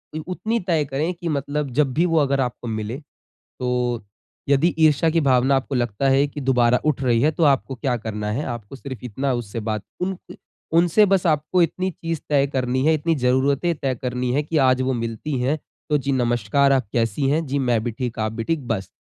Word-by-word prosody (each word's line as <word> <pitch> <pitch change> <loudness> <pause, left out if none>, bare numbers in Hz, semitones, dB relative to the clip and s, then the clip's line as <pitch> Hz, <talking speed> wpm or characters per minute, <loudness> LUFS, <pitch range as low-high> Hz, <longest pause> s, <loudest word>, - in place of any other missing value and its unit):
उ - - -2
उतनी 220 +5 -1
तय 160 -4 +2
करे 145 +6 -1
की 170 -1 -5
मतलब 145 0 -2
जब 140 -4 +2
भी 165 +6 +2
वो 165 -2 +1
अगर 140 -2 +2
आपको 125 -1 -3
मिले 110 +2 -3 0.6
तो 125 -2 -1 0.4
यदि 140 +5 +3
ईर्षा 160 0 +4
की 165 +1 +2
भावना 135 -1 +3
आपको 135 +1 -2
लगता 120 +1 0
है 135 +1 +4
कि 145 - -7
दोबारा 125 -2 +3
उठ 145 -3 +1
रही 120 -3 +2
है 150 - +4
तो 160 - -4
आपको 135 -2 +2
क्या 125 0 -1
करना 105 -2 -4
है? 140 +8 -2
आपको 120 +1 -6
सिर्फ़ 130 -4 -8
इतना 130 +4 -2
उससे 115 -2 -4
बात 110 -2 -1 0.2
उनके 185 0 -5 0.4
उनसे 175 +5 +5
बस 195 -2 +2
आपको 155 +3 +2
इतनी 185 +3 0
चीज़ 165 -2 -4
तय 140 -2 +3
करनी 130 0 0
है, 160 - +5
इतनी 160 +2 +1
जरूरतें 140 +5 +1
तय 135 -3 -1
करनी 125 -1 -1
है 145 - +2
कि 155 +2 -3
आज 130 -2 +3
वो 130 +1 0
मिलती 115 +4 -3
हैं 135 +5 0 0.3
तो 150 - +3
जी 140 0 -2
नमस्कार 120 +2 +2
आप 130 -5 +2
कैसी 115 +4 0
हैं? 160 +3 +1
जी 140 +1 -1
मैं 120 -4 +1
भी 120 - -1
ठीक, 120 0 -4
आप 110 0 -1
भी 115 0 -4
ठीक 155 -4 -2
बस। 95 -5 -2
135 Hz, 215 wpm, -22 LUFS, 120-150 Hz, 0.6 s, उनसे